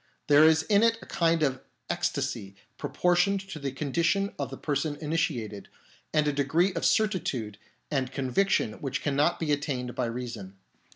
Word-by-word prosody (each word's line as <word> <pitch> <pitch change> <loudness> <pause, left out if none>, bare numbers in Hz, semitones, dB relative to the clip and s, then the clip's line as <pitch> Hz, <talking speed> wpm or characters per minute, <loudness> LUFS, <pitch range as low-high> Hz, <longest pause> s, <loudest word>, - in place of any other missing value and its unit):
There 145 +1 +6
is 160 0 +5
in 205 +2 +3
it 230 0 +4
a - - -10
kind 165 -1 +1
of 130 -3 0 0.3
ecstasy 100 0 -2 0.2
proportioned 180 +3 +2
to 190 -5 -8
the 140 -2 -3
con 135 +1 -5
dition 195 +4 +1
of 140 - -2
the 135 - -7
person 145 0 -1
initiated, 145 -10 -2 0.4
and 150 -1 +2
a 145 - +1
degree 160 +7 +2
of - - +1
certitude 135 - 0 0.3
and 130 -3 0
conviction 135 - 0
which 135 -2 -3
cannot 145 +3 +1
be 160 -3 -1
at 145 -1 +1
tained 125 -4 -3
by 125 - -1
reason. 115 -5 -6
145 Hz, 170 wpm, -28 LUFS, 130-170 Hz, 0.4 s, There